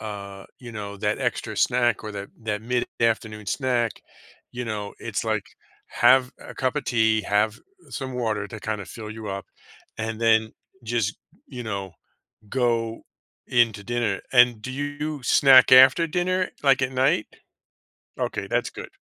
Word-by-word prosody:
uh, 100 Hz, -2 st, -7 dB, 0.2 s
you 120 Hz, -2 st, -9 dB
know, 100 Hz, -2 st, -6 dB
that 105 Hz, +1 st, -1 dB
extra -, -, -2 dB
snack 120 Hz, -3 st, +2 dB
or 105 Hz, -, -5 dB
that 100 Hz, 0 st, -6 dB
that 105 Hz, -1 st, -2 dB
mid-afternoon 115 Hz, -3 st, -1 dB
snack, 120 Hz, 0 st, 0 dB, 0.6 s
you 125 Hz, 0 st, -4 dB
know, 105 Hz, -2 st, -4 dB
it's, -, -, -3 dB
like, -, -, -1 dB, 0.4 s
have 130 Hz, -1 st, +4 dB
a -, -, -11 dB
cup 130 Hz, +2 st, -1 dB
of 150 Hz, -, -2 dB
tea, 110 Hz, -3 st, +2 dB
have 105 Hz, +2 st, +1 dB, 0.3 s
some 130 Hz, -2 st, -5 dB
water 110 Hz, -4 st, -1 dB
to 110 Hz, -, -9 dB
kinda 110 Hz, -2 st, -3 dB
fill 110 Hz, +2 st, -9 dB
you 110 Hz, -1 st, -7 dB
up, 100 Hz, 0 st, -5 dB, 0.5 s
and 110 Hz, 0 st, -4 dB
then 110 Hz, -1 st, +3 dB, 0.3 s
just, 110 Hz, -3 st, -1 dB, 0.3 s
you 125 Hz, -3 st, -7 dB
know, 100 Hz, -5 st, -5 dB, 0.6 s
go 115 Hz, -2 st, 0 dB, 0.4 s
into 115 Hz, -4 st, +2 dB
dinner. 120 Hz, -3 st, -1 dB
And, 120 Hz, -3 st, +5 dB
do 130 Hz, -, -5 dB
you 145 Hz, +1 st, -4 dB
snack 130 Hz, +1 st, +6 dB
after 130 Hz, +6 st, +8 dB
dinner, 185 Hz, +2 st, 0 dB
like, 135 Hz, -1 st, +4 dB
at 130 Hz, -, 0 dB
night? 130 Hz, -4 st, +2 dB, 0.9 s
Okay. -, -, -2 dB
That's -, -, 0 dB
good. -, -, -9 dB
115 Hz, 150 wpm, -24 LUFS, 105-130 Hz, 0.9 s, after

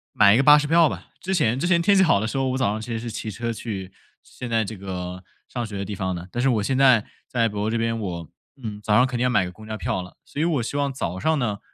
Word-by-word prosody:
买 100 Hz, 0 st, +7 dB
一 115 Hz, -, +5 dB
个 135 Hz, -, +3 dB
巴 150 Hz, +1 st, +8 dB
士 150 Hz, 0 st, 0 dB
票 165 Hz, 0 st, +5 dB
吧。 -, -, -7 dB
之 190 Hz, -, -2 dB
前 125 Hz, -8 st, +2 dB
之 170 Hz, -, 0 dB
前 170 Hz, -2 st, +3 dB
天 200 Hz, +3 st, +4 dB
气 190 Hz, -, +6 dB
好 160 Hz, -, +4 dB
的 110 Hz, -, -1 dB
时 135 Hz, -, -3 dB
候， 135 Hz, -1 st, +1 dB
我 130 Hz, -, -1 dB
早 125 Hz, -6 st, +1 dB
上 110 Hz, +1 st, -3 dB
其 120 Hz, -, -7 dB
实 115 Hz, -, -2 dB
是 120 Hz, +1 st, -5 dB
骑 110 Hz, -, -5 dB
车 115 Hz, +3 st, -3 dB
去 95 Hz, -5 st, -6 dB, 0.3 s
现 125 Hz, -, -8 dB
在 115 Hz, -1 st, +2 dB
这 110 Hz, +1 st, -7 dB
个 90 Hz, -1 st, -6 dB, 0.2 s
上 120 Hz, -2 st, -4 dB
学 105 Hz, -2 st, -6 dB
的 100 Hz, -, -3 dB
地 105 Hz, -, -5 dB
方 95 Hz, -1 st, -2 dB
的， 85 Hz, +1 st, -7 dB
但 120 Hz, -, -2 dB
是 135 Hz, -, +3 dB
我 110 Hz, -5 st, +1 dB
现 130 Hz, +5 st, 0 dB
在 130 Hz, -5 st, +5 dB, 0.2 s
在 115 Hz, -2 st, +1 dB
北 105 Hz, -2 st, -6 dB
欧 105 Hz, +1 st, 0 dB
这 115 Hz, -, 0 dB
边， 115 Hz, 0 st, 0 dB
我， 85 Hz, -7 st, -5 dB, 0.3 s
嗯， 105 Hz, -3 st, -6 dB
早 105 Hz, -1 st, +2 dB
上 125 Hz, -, +6 dB
肯 125 Hz, -2 st, -3 dB
定 120 Hz, -, 0 dB
要 125 Hz, -, +3 dB
买 125 Hz, -7 st, +2 dB
个 90 Hz, -, -6 dB
公 110 Hz, +4 st, -13 dB
交 110 Hz, 0 st, -4 dB
票 110 Hz, -4 st, -2 dB
了。 90 Hz, 0 st, -12 dB
所 145 Hz, -, -5 dB
以 -, -, +2 dB
我 155 Hz, -8 st, +1 dB
希 140 Hz, -, -3 dB
望 140 Hz, -1 st, 0 dB
早 95 Hz, -9 st, -4 dB
上 160 Hz, +7 st, +1 dB
呢 105 Hz, -5 st, -1 dB
115 Hz, 345 characters per minute, -24 LUFS, 100-130 Hz, 0.3 s, 巴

